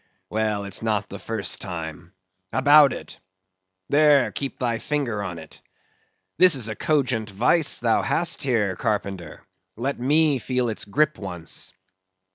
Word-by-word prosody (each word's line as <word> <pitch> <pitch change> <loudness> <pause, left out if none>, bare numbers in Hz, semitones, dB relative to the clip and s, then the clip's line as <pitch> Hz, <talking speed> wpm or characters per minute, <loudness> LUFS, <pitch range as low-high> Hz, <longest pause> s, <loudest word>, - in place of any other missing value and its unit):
Well, 105 -1 -1
it's 100 -1 -4
not 105 -3 -1
the 100 - -8
first 110 -4 -1
time. 80 +1 -7 0.4
About 145 +1 +6
it! - - -9 0.7
There; 145 -2 +4
keep 140 -1 -4
thy 120 -2 -1
finger 135 -8 -2
on 90 -4 -5
it. 80 -2 -13 0.8
This 185 -4 +8
is 120 -5 +1
a 110 - -4
cogent 125 -6 0
vice 125 - +2
thou 115 -2 +1
hast 170 0 0
here, 110 -8 0
carpenter; 95 -6 -4 0.3
let 135 +4 -3
me 145 +2 +3
feel 125 -1 -1
its 110 - -3
grip 150 +9 0
once. 90 -2 -6
115 Hz, 140 wpm, -23 LUFS, 100-140 Hz, 0.8 s, This